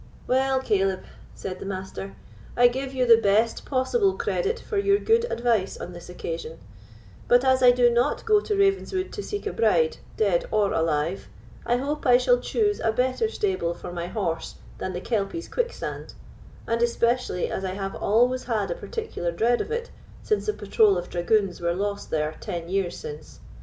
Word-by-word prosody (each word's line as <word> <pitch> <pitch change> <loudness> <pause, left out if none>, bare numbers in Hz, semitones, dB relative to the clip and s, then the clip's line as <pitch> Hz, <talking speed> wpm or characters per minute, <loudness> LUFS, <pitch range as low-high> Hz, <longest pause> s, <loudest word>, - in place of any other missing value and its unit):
"Well, 265 +1 +2
Caleb," 195 -5 0 0.3
said 185 -1 -6
the - - -7
Master, 185 - -6 0.4
"I 245 0 +7
give 265 +2 -4
you 255 -2 0
the 230 -1 +7
best 215 +3 +2
possible 380 - +1
credit 450 +3 -1
for 415 - -2
your 400 0 +3
good 460 +3 +2
advice 230 -5 0
on 180 - -7
this 175 0 -11
occasion; 165 -2 -6 0.7
but 245 +2 +4
as 260 0 +4
I 250 - +8
do 245 0 +5
not 240 +4 +1
go 430 -2 +5
to 415 0 -2
Ravenswood 390 -1 +1
to 410 - -4
seek 410 +1 -5
a 420 - -2
bride, 470 +1 +2 0.2
dead - - +2
or 205 -2 +1
alive, 160 - 0 0.4
I 240 - +3
hope 285 +3 -3
I 245 -1 +7
shall - - +3
choose 415 -2 0
a 225 - +1
better 255 - 0
stable 375 - -1
for 175 0 -8
my 170 0 -4
horse 175 -5 -3 0.2
than 185 - -3
the 180 - -4
Kelpie's 225 - -2
quicksand, 485 -1 -4 0.5
and 230 0 -1
especially 235 -4 +1
as 190 - -3
I 185 -1 -2
have 195 0 -4
always 245 +4 +2
had 230 - -1
a - - -2
particular 450 - -4
dread 230 +8 +2
of - - -5
it 470 +1 -3 0.3
since 425 0 0
the 425 - +1
patrol 205 - +3
of 175 - -5
dragoons 185 +1 +1
were 170 0 0
lost 200 +1 -3
there 155 0 -1
ten 175 -5 -5
years 190 -2 -1
since. 150 +1 -9
235 Hz, 185 wpm, -25 LUFS, -, 0.7 s, I